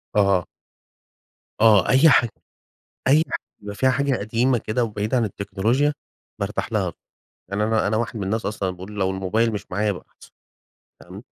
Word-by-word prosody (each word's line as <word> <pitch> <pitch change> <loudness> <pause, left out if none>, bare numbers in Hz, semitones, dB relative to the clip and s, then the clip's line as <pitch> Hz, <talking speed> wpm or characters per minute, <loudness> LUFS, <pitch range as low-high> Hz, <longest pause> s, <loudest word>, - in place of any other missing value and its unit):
آه. 100 -3 +3 1.2
آه، 105 -5 +5
أي 135 +5 +6
حاج 120 -4 +4 0.8
أي 150 +4 +5
ح - - 0 0.2
بيبقى 100 0 -8
فيها 130 +5 +2
حاجة 140 0 +1
قديمة 115 +5 +1
كده 110 +2 -1
وبعيدة 110 +2 -1
عن 120 - +2
التكنولوجيا 110 +9 0 0.5
بارتاح - - -3
لها. - - 0 0.6
يعني 100 +2 -1
أنا 110 -1 +1
أنا 110 - +1
واحد 115 0 -2
من 100 - -3
الناس 110 +4 -2
أصلًا 100 -2 -2
باقول 90 +2 -8
لو 95 -2 0
الموبايل 95 +5 0
مش 100 -1 -6
معايا 100 +4 0
يبقى 95 -3 -5
احسن - - -18 0.7
تمام، - - -11
105 Hz, 165 wpm, -23 LUFS, 100-120 Hz, 1.2 s, أي